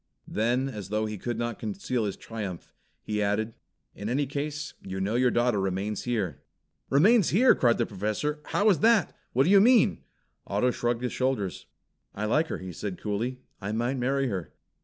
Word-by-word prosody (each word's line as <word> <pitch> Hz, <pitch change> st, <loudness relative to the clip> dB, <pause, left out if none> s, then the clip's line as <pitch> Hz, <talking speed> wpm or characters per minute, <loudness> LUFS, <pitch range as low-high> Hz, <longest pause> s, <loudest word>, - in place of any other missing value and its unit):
Then 120 Hz, +5 st, +1 dB
as 105 Hz, -7 st, -6 dB
though 110 Hz, +1 st, 0 dB
he 105 Hz, -2 st, -5 dB
could 120 Hz, +2 st, -3 dB
not 120 Hz, -1 st, -3 dB
conceal 180 Hz, -, -2 dB
his 100 Hz, -, -3 dB
triumph, 105 Hz, -6 st, -7 dB, 0.3 s
he 105 Hz, -1 st, -2 dB
added, 105 Hz, +2 st, 0 dB, 0.4 s
"In 105 Hz, +2 st, -5 dB
any 140 Hz, +4 st, +1 dB
case, 150 Hz, +2 st, -4 dB
you 95 Hz, 0 st, -5 dB
know 100 Hz, +3 st, -1 dB
your 125 Hz, +1 st, +3 dB
daughter 120 Hz, -3 st, +2 dB
remains 95 Hz, +2 st, -2 dB
here." 105 Hz, -, -2 dB, 0.5 s
"Remains 195 Hz, -, +5 dB
here?" 245 Hz, +8 st, +6 dB
cried 120 Hz, -2 st, +3 dB
the -, -, +1 dB
Professor. 110 Hz, +9 st, -2 dB
"How 205 Hz, -, +1 dB
is 185 Hz, -, +1 dB
that? 225 Hz, -1 st, +3 dB, 0.2 s
What 130 Hz, -, +4 dB
do 170 Hz, -, +2 dB
you 200 Hz, -1 st, +8 dB
mean?" 240 Hz, 0 st, +5 dB, 0.5 s
Otto 105 Hz, +6 st, +2 dB
shrugged 120 Hz, 0 st, -1 dB
his 125 Hz, -, -2 dB
shoulders. 130 Hz, -8 st, -1 dB, 0.5 s
"I 105 Hz, -, -2 dB
like 150 Hz, +9 st, +2 dB
her," -, -, -3 dB
he 95 Hz, -1 st, -7 dB
said 95 Hz, +1 st, -5 dB
coolly. 115 Hz, +5 st, -3 dB, 0.2 s
"I 100 Hz, +2 st, -3 dB
might 120 Hz, +4 st, 0 dB
marry 135 Hz, +2 st, +1 dB
her. 95 Hz, -8 st, -4 dB
120 Hz, 185 wpm, -27 LUFS, 105-135 Hz, 0.5 s, you